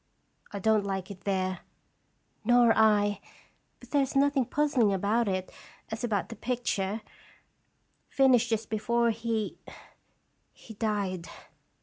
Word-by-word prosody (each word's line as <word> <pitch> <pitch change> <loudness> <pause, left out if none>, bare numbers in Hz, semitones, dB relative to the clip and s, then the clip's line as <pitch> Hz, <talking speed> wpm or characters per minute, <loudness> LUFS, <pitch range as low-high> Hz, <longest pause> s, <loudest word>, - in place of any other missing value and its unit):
"I 205 - -5
don't 215 +1 +2
like 195 -1 -4
it 190 - -12
there." 185 -2 -1 0.4
" - - -44
Nor 240 0 +5
I; 205 -2 +3 0.6
but - - -16
there 285 - +3
is 270 0 -2
nothing 275 -1 +3
puzzling 270 -6 +2
about 205 +4 +1
it 185 -1 -2 0.4
as 220 +2 -5
about 210 -5 -1
the 230 - -7
picture, 225 -5 -2 1.1
finished 250 -3 +4
just 225 -1 -2
before 235 +2 +1
he 225 -1 -3 0.9
he 225 - -13
died. 200 -5 -2
220 Hz, 125 wpm, -28 LUFS, 200-240 Hz, 1.1 s, Nor